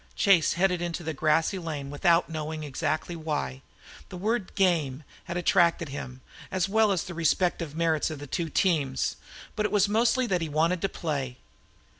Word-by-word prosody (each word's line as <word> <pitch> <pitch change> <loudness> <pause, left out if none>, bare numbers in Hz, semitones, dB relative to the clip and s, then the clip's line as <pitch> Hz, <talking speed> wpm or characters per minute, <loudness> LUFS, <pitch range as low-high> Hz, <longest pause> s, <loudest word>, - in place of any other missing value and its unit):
Chase 190 -6 +4
headed 180 -1 +1
into 175 0 -3
the 160 -1 -3
grassy 160 +5 +1
lane 150 -5 -5
without 170 +3 +3
knowing 155 -1 -4
exactly 155 +4 -2
why. 150 - -3 0.5
The 180 - -7
word 210 +1 -2
"game" 160 -7 +1 0.2
had 175 - -4
attracted 170 -2 +3
him, 130 -2 -7 0.3
as 185 0 0
well 215 +1 +3
as 185 -5 0
the 180 - -7
respective 170 -1 0
merits 160 -2 +1
of 155 - -5
the 145 - -8
two 165 +4 -3
teams; 150 -8 +1 0.4
but 215 - 0
it 210 - 0
was 205 -1 +3
mostly 230 +4 +2
that 185 -6 0
he 165 - -2
wanted 165 +4 +1
to 195 - 0
play. 140 -9 -3
165 Hz, 175 wpm, -27 LUFS, 150-185 Hz, 0.5 s, Chase